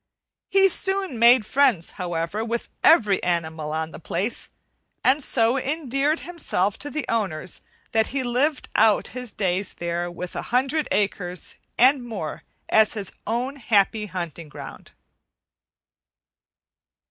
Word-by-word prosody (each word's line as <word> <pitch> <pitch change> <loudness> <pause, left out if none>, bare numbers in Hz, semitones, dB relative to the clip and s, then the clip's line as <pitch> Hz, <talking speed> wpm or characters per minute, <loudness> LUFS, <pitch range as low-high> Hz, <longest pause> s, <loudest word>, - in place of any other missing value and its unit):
He 390 0 +5
soon 385 - 0
made 235 -1 +6
friends, 255 -10 +2
however, 175 +4 -3
with 235 +1 -3
every 210 - +5
animal 160 -3 -2
on 160 +1 -2
the - - -9
place, 205 +7 -2 0.5
and 275 +3 +3
so 235 +1 +2
endeared 285 +1 0
himself 250 - -1
to 290 - -3
the 310 +1 -3
owners 185 -7 -2 0.3
that 220 -1 +2
he 270 0 -2
lived 255 +4 0
out 215 -1 +4
his 250 -3 -6
days 190 -1 -1
there 170 0 -2
with 175 0 -7
a - - -2
hundred 270 +5 +1
acres 185 -3 -1 0.2
and 260 +1 +5
more 210 -10 -5 0.3
as 220 -1 +4
his 205 -4 -3 0.2
own 250 +5 -2
happy 215 -3 +2
hunting 170 -3 -6
ground. - - -10
225 Hz, 130 wpm, -24 LUFS, 180-265 Hz, 0.5 s, made